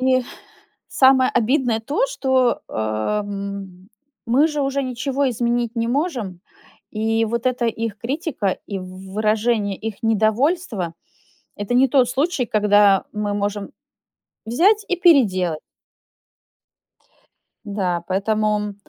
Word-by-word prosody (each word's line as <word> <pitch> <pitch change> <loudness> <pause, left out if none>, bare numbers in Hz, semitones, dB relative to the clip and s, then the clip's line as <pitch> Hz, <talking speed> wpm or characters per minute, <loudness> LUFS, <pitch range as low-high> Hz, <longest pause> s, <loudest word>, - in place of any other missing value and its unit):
И 255 0 +3 0.7
самое 260 -1 +4
обидное 245 -1 +1
то, 290 - 0
что, 260 - +1
э, - - -11
м, 195 - -4 0.4
мы 260 +6 +3
же 300 -2 -2
уже 275 0 -1
ничего 270 +2 -1
изменить 240 0 -1
не 230 0 -1
можем, 245 - -2 0.5
и 225 +1 0
вот 235 +2 -3
эта 250 -1 +1
их 225 -2 -3
критика 250 - -2
и 200 -2 -4
в 185 +1 -10
выражение 215 -1 0
их 220 -1 -7
недовольства- 220 - +1 0.6
это 205 +4 -3
не 260 +2 +5
тот 255 -1 +3
случай, 275 +2 0
когда 205 -2 +4
мы 210 -1 -2
можем 205 0 -3 0.8
взять 395 - +3
и 365 - 0
переделать. 200 - +3 2.1
Да, 185 -4 -2
поэтому 210 +1 0
225 Hz, 115 wpm, -21 LUFS, 200-260 Hz, 2.1 s, не